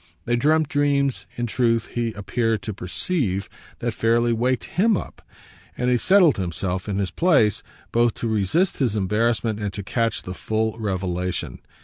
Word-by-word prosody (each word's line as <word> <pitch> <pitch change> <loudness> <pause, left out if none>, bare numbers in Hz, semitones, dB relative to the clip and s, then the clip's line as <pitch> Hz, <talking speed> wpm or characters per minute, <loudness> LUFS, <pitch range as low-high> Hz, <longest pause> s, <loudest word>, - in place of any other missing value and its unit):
They 120 - +1
dreamt 155 +5 +3
dreams, 140 -2 +1
in 120 - -1
truth, 115 -1 +1
he 120 -1 -1
appeared 110 +1 -1
to 110 - -4
perceive, 100 - -2 0.3
that 120 -1 -1
fairly 115 +2 +2
waked 125 +1 0
HIM 210 +2 +2
up, - - -8 0.6
and 125 0 +1
he 125 - +4
settled 185 - +5
himself 90 +1 -3
in 100 - -1
his 100 -2 -1
place 140 - +3 0.3
both 120 0 +2
to 115 - -3
resist 110 - +1
his 120 -6 +1
embarrassment 110 +2 0
and 105 -2 -2
to 100 - -5
catch 115 +3 -1
the 90 - -6
full 110 +3 -1
revelation. 90 - -2
115 Hz, 160 wpm, -23 LUFS, 100-125 Hz, 0.6 s, settled